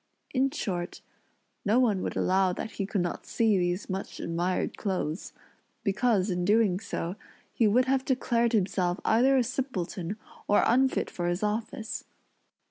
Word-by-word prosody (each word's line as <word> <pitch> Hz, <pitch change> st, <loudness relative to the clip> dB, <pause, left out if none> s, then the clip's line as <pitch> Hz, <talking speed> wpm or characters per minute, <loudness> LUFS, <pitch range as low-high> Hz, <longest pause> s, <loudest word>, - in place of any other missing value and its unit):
in 270 Hz, +1 st, +3 dB
short, 185 Hz, -, -3 dB, 0.6 s
no 215 Hz, +4 st, +3 dB
one 215 Hz, -7 st, +2 dB
would -, -, -3 dB
allow 185 Hz, 0 st, +3 dB
that 220 Hz, +5 st, -5 dB
he 195 Hz, -1 st, -3 dB
could 200 Hz, -2 st, 0 dB
not 175 Hz, -1 st, -3 dB
see 220 Hz, -4 st, +2 dB
these 175 Hz, +2 st, -1 dB
much 190 Hz, 0 st, -5 dB
admired 175 Hz, +2 st, -1 dB
clothes; 185 Hz, -5 st, -3 dB, 0.5 s
because, 210 Hz, -1 st, +2 dB
in 180 Hz, 0 st, -1 dB
doing 205 Hz, -1 st, +3 dB
so, 190 Hz, -3 st, -4 dB, 0.4 s
he 225 Hz, -, +3 dB
would 245 Hz, +5 st, +4 dB
have 265 Hz, 0 st, +1 dB
declared 240 Hz, -3 st, +1 dB
himself 185 Hz, -3 st, +1 dB
either 260 Hz, +5 st, +4 dB
a 255 Hz, -, +4 dB
simpleton 210 Hz, -7 st, -3 dB, 0.3 s
or 205 Hz, -, +4 dB
unfit 260 Hz, +3 st, +3 dB
for 175 Hz, -1 st, -2 dB
his 175 Hz, +3 st, -1 dB
office. 220 Hz, +1 st, -2 dB
205 Hz, 150 wpm, -28 LUFS, 180-235 Hz, 0.6 s, would